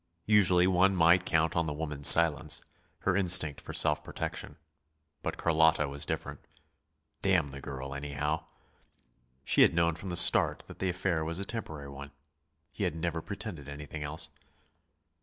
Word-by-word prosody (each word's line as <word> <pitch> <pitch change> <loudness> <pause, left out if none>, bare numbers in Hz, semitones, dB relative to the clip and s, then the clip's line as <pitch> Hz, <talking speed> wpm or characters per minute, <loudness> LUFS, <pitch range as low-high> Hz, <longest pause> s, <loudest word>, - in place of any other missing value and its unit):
Usually 95 -4 +4
one 95 +1 +2
might 85 +1 +3
count 80 0 0
on 85 -1 0
the 75 - -4
woman's 75 -2 +1
silence, 80 -3 +6 0.4
her - - 0
instinct 90 -6 +3
for - - -9
self 75 -1 +1
protection. 75 - -7 0.6
But - - -5
Carlotta 80 -2 +2
was 70 +1 -3
different. - - -5 0.8
Damn 90 -7 +1
the 70 0 -10
girl, 70 0 -7
anyhow! 75 +3 -4 1.0
She - - +2
had - - +4
known 85 0 +1
from 90 +4 -9
the 85 - -2
start 85 - +4
that - - -14
the 95 - -1
affair 90 -2 -2
was 85 +3 -4
a 100 - -4
temporary 80 -11 -7
one; 70 +1 -10 0.6
he - - -6
had - - -2
never 80 0 -3
pretended 90 -7 -8
anything 75 +1 -9
else. 75 +2 -5
80 Hz, 160 wpm, -29 LUFS, 75-90 Hz, 1.0 s, silence